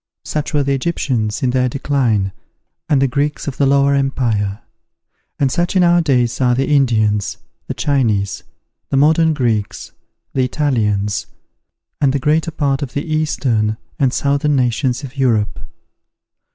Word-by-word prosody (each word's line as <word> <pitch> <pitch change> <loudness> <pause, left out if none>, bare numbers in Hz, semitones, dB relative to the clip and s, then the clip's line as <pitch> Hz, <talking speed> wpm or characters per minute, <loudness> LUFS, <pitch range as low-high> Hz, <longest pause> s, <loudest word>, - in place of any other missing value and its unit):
Such 150 -1 -3
were 145 -3 +1
the 140 0 0
Egyptians 130 -8 -1
in 125 - +2
their 125 0 +1
decline, 120 -8 0 0.6
and 145 - +3
the 135 - +3
Greeks 145 +4 -2
of 140 - -4
the 140 - +2
Lower 140 0 +3
Empire; 120 -7 0 0.8
and 135 -2 +1
such 175 +1 -1
in 185 - +4
our 175 0 +4
days 125 -6 +1
are 125 -1 +3
the 135 +2 +1
Indians, 110 -8 +1 0.3
the - - -4
Chinese, 110 - 0 0.5
the 135 - 0
modern 160 +2 +4
Greeks, 115 -7 -2 0.4
the 130 - +1
Italians, 105 - 0 0.7
and 135 -2 +3
the - - +2
greater 155 +4 +1
part 145 -3 -1
of 135 -3 -5
the 145 - -2
eastern 120 -8 0 0.2
and 135 -3 +3
southern 140 +2 +1
nations 125 +1 0
of 135 +1 -9
Europe. 115 -6 +1
135 Hz, 150 wpm, -18 LUFS, 115-145 Hz, 0.8 s, in